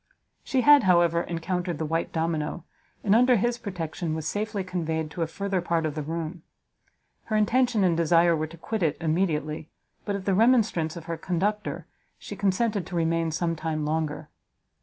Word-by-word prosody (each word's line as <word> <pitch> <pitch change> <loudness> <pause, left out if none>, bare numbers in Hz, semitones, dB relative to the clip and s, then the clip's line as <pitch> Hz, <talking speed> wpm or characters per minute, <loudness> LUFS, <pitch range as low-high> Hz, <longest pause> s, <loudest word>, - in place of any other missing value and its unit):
She 260 - +1
had, 290 -3 +7
however, 170 -2 +4
encountered 175 0 -3
the 160 - -2
white 165 +2 -1
domino, 160 0 -2 0.4
and, 200 - +3
under 250 +2 +5
his 240 +2 0
protection, 170 -6 -4
was 160 -1 -4
safely 210 -1 -2
conveyed 160 -4 -3
to 170 - -5
a 165 - +1
further 195 +2 -2
part 170 -2 0
of 155 - -2
the 155 - -3
room. 165 +2 -4 0.8
Her 220 - -2
intention 235 0 +2
and 175 -3 +3
desire 170 +1 +4
were 155 0 -2
to 165 +2 -13
quit 220 +6 -4
it 155 -4 +1
immediately, 155 -2 -1 0.3
but 205 - -2
at 195 -1 -5
the 195 - +2
remonstrance 215 -7 +3
of 170 -2 -8
her 165 -1 -4
conductor, 190 +5 -2 0.3
she 205 - -8
consented 200 0 0
to 180 - -6
remain 165 0 +1
some 165 +1 -1
time 155 -1 -3
longer. 150 -1 -2
170 Hz, 180 wpm, -26 LUFS, 160-200 Hz, 0.8 s, had